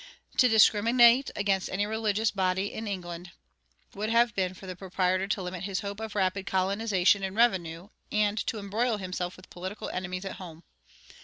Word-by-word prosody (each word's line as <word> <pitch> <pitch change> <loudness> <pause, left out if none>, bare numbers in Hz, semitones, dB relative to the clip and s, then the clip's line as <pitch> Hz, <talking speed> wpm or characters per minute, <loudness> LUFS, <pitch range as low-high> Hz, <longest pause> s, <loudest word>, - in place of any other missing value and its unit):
To 255 - +6
discriminate 235 +4 +5
against 195 -2 0
any 200 +2 -1
religious 220 0 0
body 190 0 -1
in 220 0 -5
England 175 -2 -6 0.6
would 210 +2 -3
have 235 0 +3
been 185 -2 -1
for 190 - -12
the 185 -1 -6
proprietor 185 0 -1
to 205 -1 -1
limit 180 0 -5
his 195 -1 -2
hope 200 0 -6
of 220 -1 -6
rapid 195 0 0
colonization 195 0 +2
and 190 0 -4
revenue 185 -6 +1 0.2
and 210 0 +1
to 225 - -1
embroil 215 +3 -1
himself 185 -2 -4
with 185 - -17
political 185 +4 -6
enemies 185 +1 -4
at 195 - -6
home. 170 -3 -10
195 Hz, 170 wpm, -28 LUFS, 185-215 Hz, 0.6 s, To